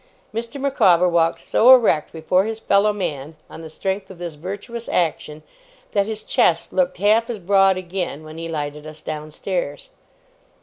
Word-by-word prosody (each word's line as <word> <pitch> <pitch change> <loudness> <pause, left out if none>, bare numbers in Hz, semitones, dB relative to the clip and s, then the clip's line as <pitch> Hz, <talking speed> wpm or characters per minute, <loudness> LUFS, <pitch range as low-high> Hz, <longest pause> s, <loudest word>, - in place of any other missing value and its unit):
Mr. 235 +5 -5
Micawber 200 -11 +3
walked 170 -1 +2
so 245 +3 +4
erect 220 -11 +1
before 175 +4 +1
his 220 0 -3
fellow 205 0 +3
man, 155 -7 -4 0.2
on - - -9
the 160 - -9
strength 190 +4 -3
of 190 - -11
this 175 -2 -6
virtuous 200 +9 -7
action, 155 -3 -1 0.5
that 200 -1 +1
his 220 -1 -5
chest 170 0 +1
looked 180 -1 +1
half 215 +5 +3
as 235 - -3
broad 195 0 +3
again 180 -4 -4
when 155 +1 -10
he 165 0 -5
lighted 150 -1 -5
us 155 0 -10
downstairs. 155 - -5
185 Hz, 165 wpm, -21 LUFS, 160-210 Hz, 0.5 s, so